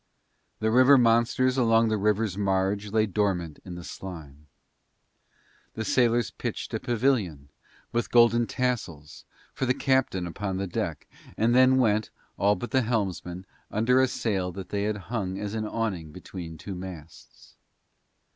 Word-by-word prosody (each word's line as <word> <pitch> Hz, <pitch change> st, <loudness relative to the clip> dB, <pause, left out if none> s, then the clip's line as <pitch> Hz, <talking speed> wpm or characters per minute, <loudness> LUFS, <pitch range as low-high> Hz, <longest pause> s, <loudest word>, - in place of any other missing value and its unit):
The 110 Hz, 0 st, +1 dB
river 130 Hz, +4 st, +7 dB
monsters 120 Hz, +2 st, +3 dB
along 115 Hz, -1 st, +4 dB
the 110 Hz, -, +1 dB
river's 105 Hz, -1 st, +1 dB
marge 100 Hz, +1 st, 0 dB
lay 110 Hz, 0 st, +3 dB
dormant 95 Hz, -6 st, -1 dB
in 90 Hz, -2 st, -8 dB
the 85 Hz, -, -8 dB
slime. 75 Hz, -6 st, -9 dB, 1.3 s
The 110 Hz, -, -3 dB
sailors 120 Hz, -4 st, +2 dB
pitched -, -, -5 dB
a -, -, -1 dB
pavilion, 110 Hz, -, 0 dB, 0.4 s
with 120 Hz, 0 st, -1 dB
golden 120 Hz, -1 st, +5 dB
tassels, 100 Hz, -, -3 dB, 0.3 s
for 130 Hz, -, -2 dB
the 125 Hz, -, +2 dB
captain 130 Hz, -9 st, +1 dB
upon 95 Hz, +2 st, -4 dB
the 100 Hz, -, -2 dB
deck, 90 Hz, -, -4 dB, 0.3 s
and 115 Hz, +2 st, +2 dB
then 130 Hz, +1 st, +6 dB
went, 110 Hz, -4 st, +2 dB, 0.3 s
all 100 Hz, +1 st, +3 dB
but 120 Hz, -, -6 dB
the 130 Hz, -, +3 dB
helmsman, 95 Hz, -6 st, -2 dB, 0.2 s
under 125 Hz, +5 st, +3 dB
a 130 Hz, -, +4 dB
sail 95 Hz, -7 st, -2 dB
that 95 Hz, 0 st, -8 dB
they 100 Hz, 0 st, -1 dB
had 105 Hz, 0 st, -1 dB, 0.2 s
hung 95 Hz, -5 st, -2 dB
as 105 Hz, +1 st, -4 dB
an 110 Hz, -1 st, -2 dB
awning 95 Hz, -9 st, -3 dB
between 85 Hz, -1 st, -8 dB
two 100 Hz, -, -7 dB
masts. 90 Hz, -4 st, -11 dB
105 Hz, 150 wpm, -27 LUFS, 95-120 Hz, 1.3 s, river